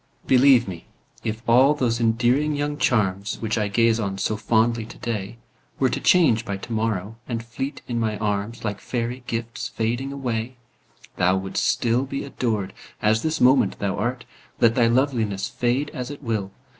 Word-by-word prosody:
Believe 130 -2 +5
me, 90 -3 -8 0.4
if 110 +1 -4
all 130 +5 +5
those 120 -5 0
endearing 120 +6 +2
young 145 0 -1
charms, 100 -3 +1
Which 110 0 -1
I 105 -2 0
gaze 115 +2 +2
on 100 -3 -2
so 110 - -1
fondly 110 +2 +1
today, 115 -1 -5 0.4
Were 130 -2 +2
to - - -1
change 135 -11 +4
by 100 -2 -4
to 115 +4 -7
morrow, 110 -1 -2
and 115 -2 -4
fleet 135 +4 -5
in 120 -1 -2
my 110 -2 -1
arms, 105 +2 -2
Like 105 -1 -2
fairy 125 +1 -3
gifts 115 0 -3
fading 120 +4 -2
away, 125 -3 -3 0.6
Thou 90 +1 +3
wouldst 95 0 -2
still 120 +2 +1
be 140 0 -4
adored, 115 -8 -2 0.3
as 110 +1 +2
this 160 0 -1
moment 130 +2 +4
thou 100 -1 -1
art. 120 +4 -2 0.3
Let 115 -1 +5
thy 120 -1 +3
loveliness 115 -5 +1
fade 125 +4 -1
as 125 0 -5
it 145 0 -9
will. 110 -5 -2
115 Hz, 170 wpm, -23 LUFS, 110-125 Hz, 0.6 s, Believe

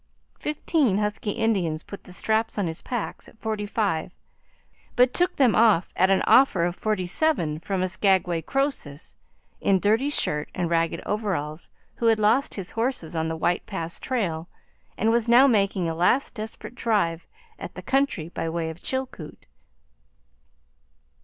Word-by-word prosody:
Fifteen 300 - +1
husky 210 0 -2
Indians 195 -8 0
put 200 - -10
the - - -11
straps 220 +4 0
on 205 - +1
his 165 -1 -3
packs 240 -4 -5
at - - -21
forty 215 -2 -3
five, 200 -7 -1 0.8
but 250 0 +4
took 360 +1 +1
them 255 -6 +4
off 215 -6 +3
at 185 +1 +3
an 195 - +3
offer 225 -10 +5
of 175 0 -2
forty 210 -3 -1
seven 175 - 0
from 185 +2 -2
a - - +1
Skaguay 180 -3 +1
Croesus 270 - -2 0.4
in 195 -1 +2
dirty 220 +8 +2
shirt 150 - -1
and 175 -2 -2
ragged 165 0 0
overalls 180 -7 -3 0.3
who 230 - +1
had 225 -1 +4
lost 225 +7 +2
his 195 -3 -6
horses 225 -9 -2
on 160 0 0
the 160 0 -3
White 175 +2 0
Pass 170 -4 -4
trail 175 -10 -2 0.5
and 220 +2 +2
was 235 0 +1
now 240 +3 +7
making 200 -7 +2
a 165 - -1
last 180 +11 +2
desperate 220 +1 -7
drive 200 -9 0 0.3
at - - -8
the - - -8
country 270 - 0
by 165 - -3
way 165 -1 -2
of 160 - -13
Chilkoot. 260 -12 -5
200 Hz, 160 wpm, -25 LUFS, 170-230 Hz, 0.8 s, now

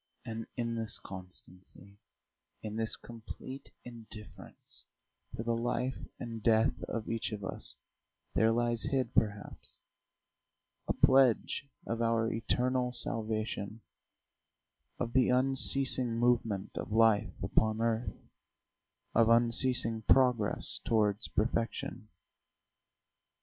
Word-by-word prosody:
And 115 0 -6
in 115 -1 -2
this 115 -1 -4
constancy, 95 +1 -9 0.6
in 105 -1 -6
this 110 0 -1
complete 120 +4 -10 0.2
indifference 115 -3 -12 0.5
to 115 - -5
the 115 0 -1
life 125 +2 -3
and 115 -2 -7
death 110 0 +2
of 110 -2 -5
each 115 -1 -3
of 105 -2 -6
us, - - -3 0.6
there 110 0 +3
lies 120 -2 -1
hid, 130 -4 -1
perhaps, 105 -2 -3 1.1
a - - +1
pledge 130 +1 +3 0.2
of 115 0 -3
our 115 -1 +1
eternal 125 +2 0
salvation, 110 -2 -4 1.2
of 120 -1 -4
the 130 -2 +3
unceasing 130 -1 +5
movement 115 -5 0
of - - -7
life 110 -1 +3
upon 110 0 +1
earth, 115 0 -2 0.9
of 115 -1 +4
unceasing 115 -1 +4
progress 125 -3 +2
towards 105 -2 0
perfection. 110 0 -3
115 Hz, 100 wpm, -31 LUFS, 110-120 Hz, 1.2 s, unceasing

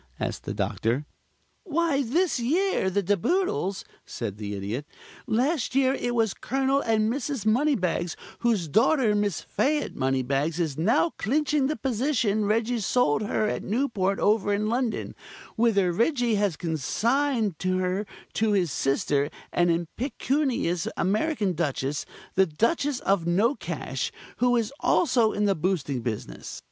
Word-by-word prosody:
asked - - -3
the - - -3
Doctor. 120 +6 -1 0.6
"Why 330 - +1
this 300 +5 +1
year, 315 - +1
the 200 +2 0
De 205 +3 +2
Boodles," 345 - 0 0.2
said 105 -4 -5
the 105 -1 -5
Idiot. 105 +9 -4 0.4
"Last 260 +4 0
year 265 -1 +4
it 245 -3 -2
was 225 -3 +2
Colonel 270 +1 0
and 220 -3 +1
Mrs. 275 -4 -3
Moneybags, 215 - +1 0.2
whose 220 -8 +1
daughter, 230 - +3
Miss 205 -5 0
Fayette 295 +1 -1
Moneybags, 135 +4 0
is 160 -5 -1
now 225 - +2
clinching 295 +3 +1
the 305 - -1
position 235 -5 0
Reggie 230 +3 +1
sold 210 -6 +2
her 215 0 0
at - - -2
Newport 205 -5 0
over 205 -1 +2
in 205 +1 +1
London, 235 0 -1 0.4
whither 205 -6 +3
Reggie 240 - +1
has 200 -6 +1
consigned 220 - 0
her 185 +2 0 0.3
to 220 -1 +1
his 180 -6 +1
sister, 140 +1 +1 0.2
an 175 0 +3
impecunious 230 - -1
American 210 - +1
Duchess 145 -3 -2 0.3
the 190 0 +4
Duchess 250 - 0
of 195 -4 +1
Nocash 215 +10 0 0.3
who 245 0 +3
is 230 +1 0
also 235 -9 +3
in 210 - 0
the 200 - +3
boosting 155 -7 -1
business. 110 - -5
215 Hz, 135 wpm, -26 LUFS, 175-260 Hz, 0.6 s, year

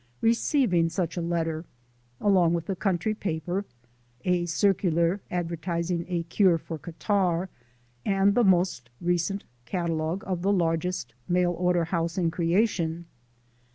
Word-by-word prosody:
receiving 225 - +3
such 170 0 -2
a 175 - -2
letter 165 -1 -1 0.6
(along 180 -4 +4
with 165 -1 -3
the 195 - -2
country 190 +2 0
paper, 180 0 -3 0.6
a 180 -1 +1
circular 175 0 +2
advertising 170 0 -2
a 175 -2 -1
cure 175 +1 +3
for 160 0 -7
catarrh, 180 +2 0 0.5
and 195 0 +3
the 245 - +3
most 180 - +2
recent 175 +3 0 0.2
catalogue 165 - -2
of 185 -2 -2
the 195 +2 +2
largest 175 -1 0
mail 180 0 +2
order 175 0 +1
house 165 0 -2
in 170 -3 +1
creation). 170 -1 0
175 Hz, 125 wpm, -27 LUFS, 165-190 Hz, 0.6 s, along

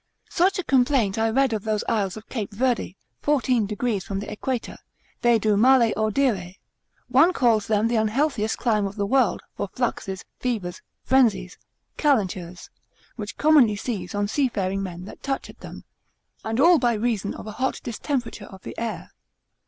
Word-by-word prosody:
Such 375 +4 +2
a 370 - -2
complaint 250 -7 +2
I 225 0 +2
read 265 +1 +2
of 215 -2 -2
those 215 -1 -1
isles 200 -3 0
of 215 - -11
Cape 220 -4 -4
Verde, 230 -4 -1 0.2
fourteen 255 -6 +1
degrees 210 -1 -2
from 195 -1 -4
the 205 - -6
Equator, 240 +3 -4 0.4
they 240 -2 +4
do 215 -1 +1
male 240 +1 +5
audire: 215 -5 0 0.5
One 360 +2 +5
calls 230 -8 +2
them 215 0 +2
the 235 0 +1
unhealthiest 220 0 0
clime 215 -4 +1
of 195 - -8
the 205 -2 -1
world, 250 -1 +2
for - - -3
fluxes, 195 -6 -3
fevers, 215 -8 -3 0.2
frenzies, 210 -9 +2 0.4
calentures, 185 - -1 0.4
which 210 -2 -7
commonly 285 -8 +5
seize 205 -4 -4
on 205 0 0
seafaring 200 -7 0
men 180 -2 -6
that - - -11
touch 270 -1 -3
at - - -25
them, - - -10 0.6
and 225 +2 -2
all 335 +3 +6
by 240 -2 +2
reason 215 -2 -1
of - - -9
a 215 - -6
hot 260 +5 -2
distemperature 240 -2 -3
of 190 -1 -13
the - - -8
air. 230 -1 -4
220 Hz, 170 wpm, -24 LUFS, 205-255 Hz, 0.6 s, all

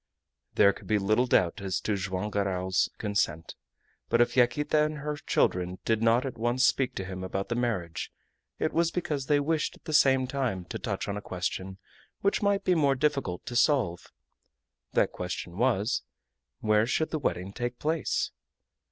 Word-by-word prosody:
There 100 -1 +6
could - - -13
be 105 - +3
little 110 +5 +2
doubt 90 -5 +2
as 95 -1 -1
to 105 - 0
Joam 95 +1 -3
Garral's 95 -2 0
consent. 100 -7 -1 0.6
But 115 - +3
if 120 - +3
Yaquita 150 +4 +3
and 155 0 -2
her 150 +1 -3
children 90 -9 0
did 110 -1 +1
not 115 +3 +3
at 125 -4 -5
once 120 +3 +2
speak 130 -2 +1
to 95 - -3
him 95 0 -6
about 95 +2 -3
the 120 - 0
marriage, 110 -9 -2 0.5
it - - -1
was 170 0 +2
because 150 -6 -3
they 145 -1 +4
wished 155 +2 0
at - - -21
the 155 - -4
same 135 -3 +5
time 125 -9 -2
to - - -4
touch - - -3
on 100 - -2
a - - -5
question 95 0 -4 0.4
which 200 - +1
might 200 -1 +2
be 185 - +3
more 145 -5 +3
difficult 140 -10 -1
to 120 - -6
solve. 120 - +2 0.8
That - - +3
question 90 -1 -5
was, 115 -1 +1 0.6
Where 110 0 +3
should 160 +5 0
the 155 - -1
wedding 95 -8 -2
take 120 +1 -3
place? 160 +1 -1
120 Hz, 180 wpm, -28 LUFS, 95-140 Hz, 0.8 s, There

